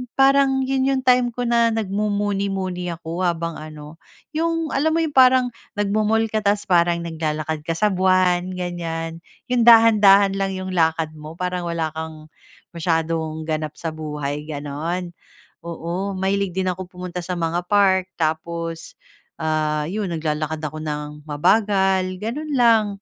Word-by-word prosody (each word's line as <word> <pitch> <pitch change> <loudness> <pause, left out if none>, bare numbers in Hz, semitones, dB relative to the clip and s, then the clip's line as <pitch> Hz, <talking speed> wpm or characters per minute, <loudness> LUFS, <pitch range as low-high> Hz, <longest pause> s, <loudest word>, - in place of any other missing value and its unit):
parang 270 0 +4
yun 265 0 0
yung 270 -1 +1
time 250 -1 +4
ko 245 +1 -4
na 235 -1 +3
nagmumuni-muni 200 -3 -1
ako 165 +2 -6
habang 170 -1 -2
ano, 155 +1 -10 0.3
yung 330 0 -1
alam 315 +4 +1
mo 330 - +2
yung 310 - -2
parang 255 -2 +5 0.2
nagmo-mall 215 +2 +1
ka 215 - +1
tapos 205 0 +1
parang 170 -1 +2
naglalakad 155 -1 -3
ka 165 - 0
sa 210 +4 +2
buwan, 185 -1 +2
ganyan, 165 -2 -4 0.3
yung 240 -1 +2
dahan-dahan 210 -4 +7
lang 195 -1 -1
yung 185 0 -5
lakad 160 -2 +1
mo, 155 +2 -9
parang 180 -1 -3
wala 165 -2 -2
kang 160 -1 -8 0.4
masyadong 160 -1 -1
ganap 155 -1 -3
sa 165 -1 -4
buhay, 150 -1 -5
gano'n. 155 +5 -4 0.6
Oo, 175 +4 -4
mahilig 190 -1 -1
din 185 -1 0
akong 185 0 -7
pumunta 180 0 -7
sa 180 +1 -4
mga 170 0 -1
park 190 -2 +3
tapos 165 +1 -3 0.4
ah, 155 -1 -1
yun 195 +5 -3
naglalakad 155 0 -3
ako 155 +1 -4
nang 150 -1 -5
mabagal, 190 +4 +2 0.2
ganun 290 +6 -3
lang. 230 -4 +4
180 Hz, 145 wpm, -22 LUFS, 160-210 Hz, 0.6 s, dahan-dahan